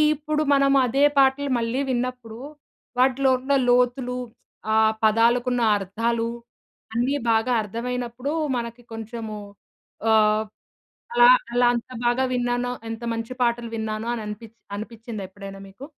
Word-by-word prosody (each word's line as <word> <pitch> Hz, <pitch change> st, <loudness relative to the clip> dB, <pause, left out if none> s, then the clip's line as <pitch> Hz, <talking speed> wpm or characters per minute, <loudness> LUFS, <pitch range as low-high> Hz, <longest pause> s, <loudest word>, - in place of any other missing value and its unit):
ఇప్పుడు 305 Hz, +1 st, -1 dB
మనం 275 Hz, 0 st, +4 dB
అదే 270 Hz, +4 st, +1 dB
పాటలు 275 Hz, +1 st, +3 dB
మళ్ళీ 230 Hz, +4 st, -1 dB
విన్నప్పుడు, 245 Hz, -2 st, -4 dB, 0.6 s
వాటిలో 265 Hz, +1 st, +3 dB
ఉన్న 275 Hz, +2 st, -1 dB, 0.2 s
లోతులు 250 Hz, 0 st, +2 dB, 0.5 s
ఆహ్, 220 Hz, 0 st, +4 dB
పదాలకున్న 240 Hz, +3 st, +3 dB, 0.2 s
అర్థాలు, 230 Hz, +4 st, -1 dB, 0.6 s
అన్నీ 245 Hz, +5 st, +1 dB, 0.2 s
బాగా 225 Hz, +3 st, +2 dB
అర్థమైనప్పుడు 245 Hz, +5 st, -4 dB, 0.3 s
మనకి 235 Hz, 0 st, -5 dB
కొంచెము 225 Hz, -1 st, -6 dB, 0.7 s
ఆహ్, 215 Hz, 0 st, +4 dB, 0.7 s
అలా 485 Hz, +1 st, +8 dB, 0.2 s
అలా 245 Hz, 0 st, +4 dB
అంత 235 Hz, +2 st, -6 dB, 0.2 s
బాగా 245 Hz, +2 st, +2 dB
విన్నానో! 245 Hz, 0 st, -1 dB, 0.2 s
ఎంత 225 Hz, +1 st, -6 dB
మంచి 230 Hz, +2 st, -5 dB
పాటలు 235 Hz, -1 st, 0 dB
విన్నానో! 220 Hz, +1 st, -3 dB, 0.2 s
అనిపి 210 Hz, +2 st, -7 dB, 0.3 s
అనిపిచ్చిందా 220 Hz, -1 st, -7 dB
ఎప్పుడైనా 195 Hz, 0 st, -10 dB
మీకు? 195 Hz, +8 st, -12 dB
240 Hz, 115 wpm, -24 LUFS, 225-250 Hz, 0.7 s, అలా